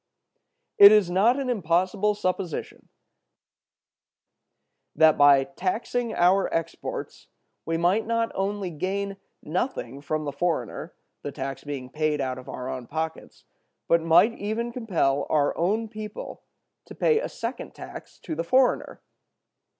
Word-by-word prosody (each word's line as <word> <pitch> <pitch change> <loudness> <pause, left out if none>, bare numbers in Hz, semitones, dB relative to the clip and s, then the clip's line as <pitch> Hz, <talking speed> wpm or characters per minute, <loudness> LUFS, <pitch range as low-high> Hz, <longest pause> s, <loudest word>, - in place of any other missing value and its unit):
It 200 0 +11
is 210 -5 +4
not 225 +9 +3
an 270 - -3
impossible 190 0 +1
supposition 185 -4 -4 2.1
that 160 0 +6
by 145 -1 +6
taxing 220 - -2
our 185 +3 +3
exports 165 -1 -4 0.4
we 165 0 0
might 185 +7 +1
not 230 0 0
only 195 -1 -2
gain 195 +5 -3 0.3
nothing 150 - -3
from 155 +1 -2
the 145 - -2
foreigner, 150 -5 -3 0.3
the 145 - -5
tax 135 0 -5
being 135 -3 -6
paid 155 -1 0
out 130 -2 -2
of 130 - -12
our 125 - -6
own 130 -2 -5
pockets, 160 +1 -5 0.4
but 170 0 +4
might 165 +8 +5
even 225 +3 -2
compel 170 - 0
our 145 -2 +2
own 210 +7 0
people 215 -1 -8 0.4
to - - -11
pay 460 -2 +3
a - - -4
second - - -6
tax - - -10
to 165 - -5
the 165 +2 -2
foreigner. 255 +8 +1
175 Hz, 135 wpm, -25 LUFS, 150-210 Hz, 2.1 s, It